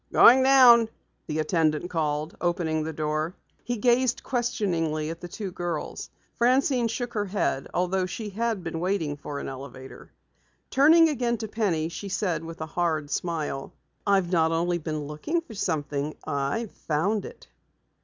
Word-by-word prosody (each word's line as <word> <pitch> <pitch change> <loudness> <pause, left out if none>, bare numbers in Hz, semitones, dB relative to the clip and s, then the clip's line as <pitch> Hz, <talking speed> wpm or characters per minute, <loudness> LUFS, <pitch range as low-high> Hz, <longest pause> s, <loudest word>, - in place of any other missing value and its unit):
"Going 255 +3 +8
down," 250 -4 +7 0.4
the 155 - -2
attendant 155 +1 +1
called, 155 -1 -1
opening 170 -3 0
the 160 +1 -3
door. 155 +3 -2 0.3
He 245 0 -2
gazed 245 +2 +2
questioningly 170 - -1
at 165 - -8
the 175 - -6
two 195 +2 -6
girls. 175 -3 -4 0.3
Francine 250 0 +3
shook 240 +2 -4
her 210 -2 -1
head, 190 -8 -1
although 185 +1 0
she 210 +4 -5
had 225 -2 -1
been 165 -1 -4
waiting 175 -5 -1
for 145 0 -7
an - - -5
elevator. 135 0 -9 0.6
Turning 320 +5 +6
again 245 -5 0
to 220 0 -5
Penny 195 -8 0
she 195 +4 -6
said 180 -4 -1
with 165 0 -8
a - - -2
hard 155 -4 0
smile: 155 -5 -3 0.3
"I've 195 -3 +3
not 165 -2 +3
only 175 +1 0
been 155 -1 -3
looking 150 - -2
for 330 -9 -11
something, 150 -6 -2
I've 150 +9 -2
found 185 +7 -1
it!" - - -11
175 Hz, 155 wpm, -26 LUFS, 155-225 Hz, 0.6 s, Going